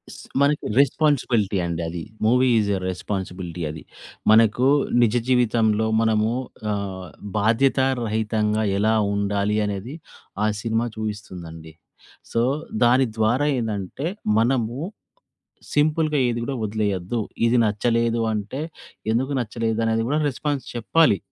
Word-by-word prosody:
స్ - - -12 0.2
మనకి 145 +1 +2
రెస్పాన్సిబిలిటీ 125 -8 +2
అండి. 85 -1 -3
అది 85 +1 -5 0.2
మూవీ 125 +3 +4
ఈస్ 105 -1 0
ఎ - - -1
రెస్పాన్సిబిలిటీ. 90 -2 -5
అది 75 +1 -7 0.5
మనకు 115 +3 +5 0.3
నిజ 115 -2 +3
జీవితంలో 110 -3 +2
మనము 110 -1 +2 0.4
ఆహ్, 95 -3 -4 0.3
బాధ్యతా 120 +5 +3 0.2
రహితంగా 110 -1 0
ఎలా 110 +2 +2 0.2
ఉండాలి 100 +1 0
అనేది 105 +7 -4 0.5
ఆ - - +3
సినిమా 115 +1 0
చూయిస్తుందండి. 90 -7 -7 0.6
సో, 115 - +1 0.4
దాని 125 +2 +5
ద్వారా 115 +6 +2
ఏందంటే 110 - -3 0.3
మనము 120 0 +1 1.0
సింపుల్‌గా 155 +1 +2
ఏది 120 -1 -1
గూడా 135 +3 -3
వదిలేయద్దు. 105 0 -1 0.3
ఇది 120 +2 +3
నచ్చలేదు 115 +2 +1
అంటే 105 +6 -4 0.5
ఎందుకు 130 +5 0
నచ్చలేదు 115 -1 -2
అనేది 115 0 +1
గూడా 150 +4 +1
రెస్పాన్స్ 140 0 -3
చెప్పాలి. 120 +1 +3
110 Hz, 115 wpm, -23 LUFS, 100-125 Hz, 1.0 s, మనకు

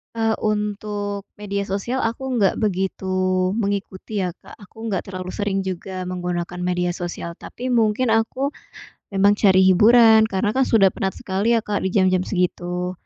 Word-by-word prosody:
Eee, 225 -1 +1
untuk 205 -1 -2
media 200 -1 -4
sosial 205 +7 -2
aku 245 +2 -2
nggak 195 -2 +3
begitu 190 -1 -1 0.5
mengikuti, 200 -1 -3
ya, 180 - -1
Kak. - - -15
Aku 220 +3 -10
nggak 195 -4 -1
terlalu 185 -1 -5
sering 200 -2 -1
juga 185 0 -5
menggunakan 180 -1 -4
media 180 0 0
sosial, 170 -1 -5
tapi 250 +1 -8
mungkin 230 0 +2
aku 225 +5 0 0.6
memang 200 0 +3
cari 190 -2 +5
hiburan 220 +3 +6
karena, 195 +1 0
kan, 265 +1 +2
sudah 195 -5 +4
penat 190 0 -3
sekali, 205 +5 0
ya, 225 - -1
Kak, 205 -1 -1
di 190 - -1
jam-jam 185 -2 +2
segitu. 180 -1 -1
200 Hz, 155 wpm, -22 LUFS, 185-220 Hz, 0.6 s, hiburan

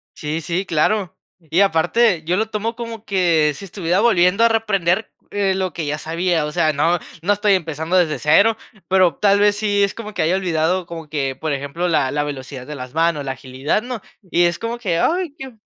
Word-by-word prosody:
Sí, 155 +1 -3
sí, 175 +4 -2
claro. 185 +4 0 0.2
Y 165 +2 0
aparte, 180 +1 +2
yo 175 +3 0
lo 220 +1 0
tomo 220 +2 -3
como 230 -2 -7
que 170 -7 +2
si 195 - -9
estuviera 180 -2 -1
volviendo 200 -2 +4
a - - +7
reaprender, 210 -3 0 0.2
eh, 200 -2 +1
lo 190 -3 -2
que 165 -1 -4
ya 150 +1 -1
sabía. 165 0 -1
O 150 - -4
sea, 160 -1 +2
no 165 +4 +1 0.2
no 200 +4 +3
estoy 205 0 +2
empezando 160 0 -2
desde 155 -6 +1
0, 200 - +4 0.3
pero 185 -4 +3
tal 200 -1 +3
vez 205 0 +4
sí 205 -1 +1
es 200 - 0
como 215 -2 -7
que - - -2
haya 170 +4 +2
olvidado 180 -1 0
como 165 -2 -9
que, 135 -3 -2
por 155 +2 -3
ejemplo, 145 +5 -2
la 145 -6 +1
la 145 0 0
velocidad 135 -2 -7
de 150 - -6
las 130 -2 -8
manos, 165 -3 +1
la 135 - -2
agilidad, 135 - -2
¿no? 245 -2 -6 0.2
Y 180 -3 +1
es 170 0 +1
como 230 +1 -3
que 185 -8 -1
ay, 345 - 0
qué 265 -5 -9
175 Hz, 215 wpm, -20 LUFS, 155-205 Hz, 0.3 s, a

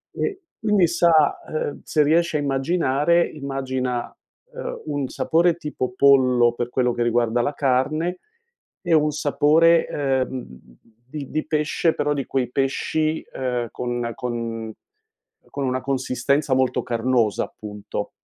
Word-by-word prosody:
E 395 -2 -3 0.2
quindi, 210 -5 +3
sa 165 -3 +3
ehm, 155 -2 -3
se 150 -2 +2
riesci 165 +2 +2
a - - +2
immaginare, 145 +3 +1
immagina, 130 -4 -4 0.4
ehm, - - -6
un 145 -3 -2
sapore 170 +1 +2
tipo 140 -6 -4
pollo 125 -4 +5
per 120 0 -3
quello 125 -1 +1
che 120 - -3
riguarda 120 0 +2
la 145 +5 -1
carne, 150 +6 0 0.6
e 175 -3 0
un 150 -1 +4
sapore, 155 +3 +3
ehm, 130 -2 -1 0.6
di 145 -2 -7
di 155 - -2
pesce 155 +2 +1
però 145 0 0
di 140 -3 -3
quei 130 -2 -1
pesci, 155 +4 -1
ehm, 125 -3 -2
conna 120 -1 -3
con 115 -2 -4 0.8
con 140 -1 -3
una 130 0 -1
consistenza 130 +1 0
molto 130 -1 +1
carnosa, 120 -2 +1
appunto. 105 -1 -7
135 Hz, 130 wpm, -22 LUFS, 125-155 Hz, 0.8 s, pollo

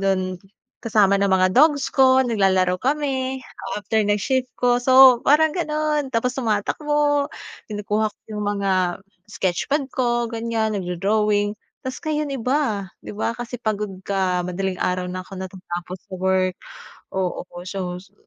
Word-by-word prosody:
dun 185 -2 0 0.4
kasama 205 -3 +3
ng 200 - +2
mga 185 -1 +3
dogs 290 +1 +4
ko, 260 -1 +5
naglalaro 190 -5 +2
kami 265 -2 -1 0.4
after 220 +1 0
ng 205 0 +2
shift 255 +5 0
ko. 245 0 +2
So 260 -1 +7
parang 305 +3 +4
ganoon. 305 -4 -1
Tapos 250 0 0
tumatakbo, 290 +5 0 0.4
kinukuha 210 +1 -1
ko - - -22 0.2
yung 210 0 -3
mga 200 -1 0 0.6
sketch 185 -4 -2
pad 285 0 +1
ko 240 -2 +1
ganyan, 225 -1 -1
nag-do-drawing, 205 +3 0 0.3
tapos 260 - -4
ngayon 305 -1 -1
iba. 250 -6 0 0.2
'Di - - -7
ba 220 - -1
kasi 245 +1 -5
pagod 210 -2 -2
ka 185 -2 0
madaling 185 +1 -3
araw 180 0 0
na 185 +1 -4
ako 185 - -18
natapos 185 -1 -6
sa 190 - -7
work, 185 -1 +1 0.6
oo, 185 -2 -2 0.2
so 185 -2 -4
so, 195 +1 -22
210 Hz, 145 wpm, -22 LUFS, 190-260 Hz, 0.6 s, So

